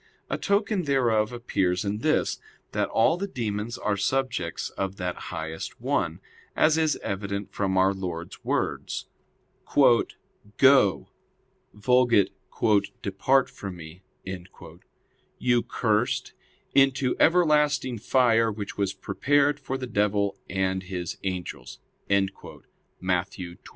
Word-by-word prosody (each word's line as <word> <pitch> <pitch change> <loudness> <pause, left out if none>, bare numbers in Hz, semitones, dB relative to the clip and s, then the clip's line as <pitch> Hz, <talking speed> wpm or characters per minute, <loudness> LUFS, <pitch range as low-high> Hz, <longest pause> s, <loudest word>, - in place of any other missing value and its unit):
A - - 0
token 200 -2 +1
thereof 120 -6 +2
appears 95 -6 -1
in 100 +1 -2
this, 155 +6 +1 0.3
that - - 0
all 115 +9 +3
the 200 +2 -3
demons 115 - -3
are 105 - 0
subjects 130 +6 -1
of 95 0 -3
that 90 -2 -3
highest 80 0 -6
one; - - -1 0.3
as 155 0 +4
is 160 -2 +2
evident 100 0 -3
from 95 -2 0
our 95 +1 +4
Lord's 90 -3 -6
words: - - -2 1.5
"Go 130 -8 +5 0.7
[Vulg. 120 0 +3 0.7
'Depart 130 +7 +2
from 95 -2 -8
Me'], 85 +1 -11 1.4
you 120 -1 +2
cursed, - - 0 0.4
into 135 -1 +3
everlasting 150 -7 +3
fire, 115 -1 +3
which 105 -1 -6
was 100 -1 0
prepared 145 +8 +1
for 135 -2 -4
the 130 - -4
devil 100 -3 +1
and 95 -1 0
his 90 -2 -5
angels" 90 -2 -5 0.3
(Matt. 95 -1 -2
25:41). 90 -2 -8
105 Hz, 110 wpm, -26 LUFS, 95-135 Hz, 1.5 s, Go